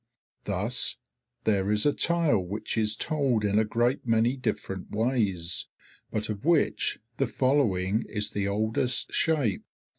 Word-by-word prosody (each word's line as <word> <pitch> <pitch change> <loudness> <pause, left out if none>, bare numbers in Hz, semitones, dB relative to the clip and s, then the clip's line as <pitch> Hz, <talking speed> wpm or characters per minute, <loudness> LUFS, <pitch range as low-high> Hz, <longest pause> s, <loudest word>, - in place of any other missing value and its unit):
Thus 105 +5 0 0.5
there 100 -2 +1
is 105 0 +2
a 145 - +4
tale 170 -9 +2
which 100 +4 -4
is 110 -1 +1
told 135 -9 0
in 105 +1 +2
a - - +4
great 120 +4 0
many 115 +2 +2
different 95 -7 -4
ways, 105 -7 0 0.4
but 110 0 -2
of 105 -1 -5
which 165 0 +2 0.2
the 135 - +1
following 115 -7 +1
is 105 -1 -1
the 100 -1 -1
oldest 110 +4 0
shape. 145 - +1
110 Hz, 140 wpm, -27 LUFS, 100-130 Hz, 0.5 s, a